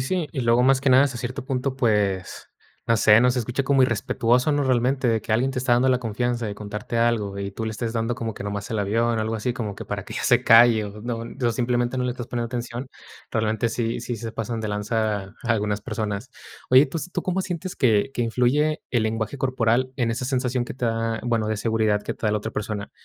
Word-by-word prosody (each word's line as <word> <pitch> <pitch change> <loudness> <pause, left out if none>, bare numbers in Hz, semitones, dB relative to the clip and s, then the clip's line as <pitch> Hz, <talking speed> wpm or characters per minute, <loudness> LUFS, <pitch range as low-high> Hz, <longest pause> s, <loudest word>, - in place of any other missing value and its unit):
sí. 160 +4 -1
Y 135 - -2
luego 120 0 +3
más 135 0 +4
que 140 - +1
nada 130 +2 +6
hasta 130 -4 -3
cierto 125 +1 -5
punto, 130 0 -2
pues, 105 -6 0 0.4
no 115 - +3
sé, 105 +1 +6
¿no?, 125 0 +4
se 125 - -1
escucha 125 +4 -2
como 135 -1 +3
irrespetuoso, 120 +3 +1
¿no? 145 0 +1
Realmente 130 +1 +1
de 115 -2 +2
que 110 - -4
alguien 130 +4 +1
te 130 - -3
está 125 -1 +2
dando 130 +2 +3
la 125 - +3
confianza 120 0 -2
de 100 - -4
contarte 105 +2 -5
algo, 110 -4 +1
y 100 0 -3
tú 110 +3 -5
le - - -2
estés 115 +1 -3
dando 115 +1 -1
como 115 -2 -4
que - - -8
nomás 100 +2 -4
el 110 - -1
avión, 115 +3 +1
algo 110 +1 -1
así 115 +3 -1
como 110 -4 -4
que - - -8
para - - -4
que - - -8
ya - - -3
se - - +4
calle 115 -1 +6
o, 105 +1 -10
¿no?, 120 0 -3
o 115 - -5
no 120 -1 -1
simplemente 120 +1 0
no 125 - 0
le 125 - 0
estás 120 -1 -7
poniendo 120 -1 -3
atención, 120 +1 -5 0.4
realmente 110 0 0
sí 115 0 -2
sí 120 - -4
se 115 +1 -6
pasan 115 0 -3
de 110 - -3
lanza 105 -1 -2
algunas 105 -3 0
personas. 110 +3 -4 0.4
Oye, 130 +3 +7
tus 170 +2 -6
¿tú - - -1
cómo 185 +1 -1
sientes 180 0 -5
que 115 -1 +2
que 120 - 0
influye 130 +6 +1
el 120 -3 +1
lenguaje 110 +4 -2
corporal 130 -1 +1
en 120 -3 0
esa 125 +2 -3
sensación 125 -1 0
que - - -7
te 125 -2 -2
da, 115 0 -1
bueno, 115 -3 0
de 110 -1 -1
seguridad 110 -2 +1
que - - -4
te - - -9
da 105 - +2
la 105 - +1
otra 105 - -5
persona? 105 -1 -4
115 Hz, 245 wpm, -24 LUFS, 110-125 Hz, 0.4 s, Oye